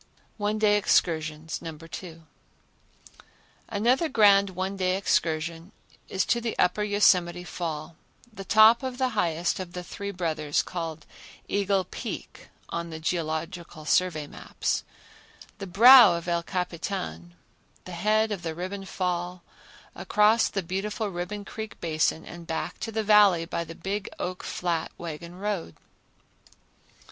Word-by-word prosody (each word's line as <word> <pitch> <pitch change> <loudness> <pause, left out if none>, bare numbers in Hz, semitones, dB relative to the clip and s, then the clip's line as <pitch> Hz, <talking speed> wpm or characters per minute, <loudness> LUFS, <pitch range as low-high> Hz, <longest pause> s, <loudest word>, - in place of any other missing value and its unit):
One 210 0 -1
Day 210 -1 +4
Excursions 160 -5 0
No. 165 -2 -7
2. 165 +1 -9 1.5
Another 250 +10 +2
grand 200 -4 +5
one 190 +1 -3
day 185 -1 0
excursion 165 -2 -1 0.4
is 190 - 0
to 235 - +1
the 230 -1 -3
Upper 180 +4 +2
Yosemite 180 -4 +3
Fall, 160 -2 -5 0.4
the 195 -1 -8
top 220 +4 +6
of 260 -2 -4
the 260 -1 +1
highest 175 -7 0
of 180 -1 -6
the 180 - -5
Three 200 +3 -6
Brothers, 160 -6 -1
called 165 -3 -5 0.4
Eagle 200 -1 +1
Peak - - -8 0.2
on 170 0 -4
the 160 -1 -7
Geological 160 0 -3
Survey 155 -2 +1
maps; - - -3 0.8
the 195 - -6
brow 230 +1 +9
of 170 0 -6
El 170 -1 +1
Capitan; 170 - -4 0.5
the 185 - -8
head 215 +5 +1
of 200 -4 -3
the 165 -2 -4
Ribbon 190 +3 -5
Fall; 180 -1 -3 0.5
across 210 +2 +3
the 195 - -3
beautiful 205 +5 -3
Ribbon 195 +3 -5
Creek 220 +1 -7
Basin; 160 -1 0
and 170 -1 -10
back 160 -1 -4
to 225 - -4
the 220 0 -1
Valley 205 -5 +5
by 170 0 -3
the 165 0 -10
Big 195 +4 -4
Oak 180 0 -4
Flat 170 -2 -2
wagon 170 +1 -7
road. 195 - -3
180 Hz, 135 wpm, -26 LUFS, 165-205 Hz, 1.5 s, brow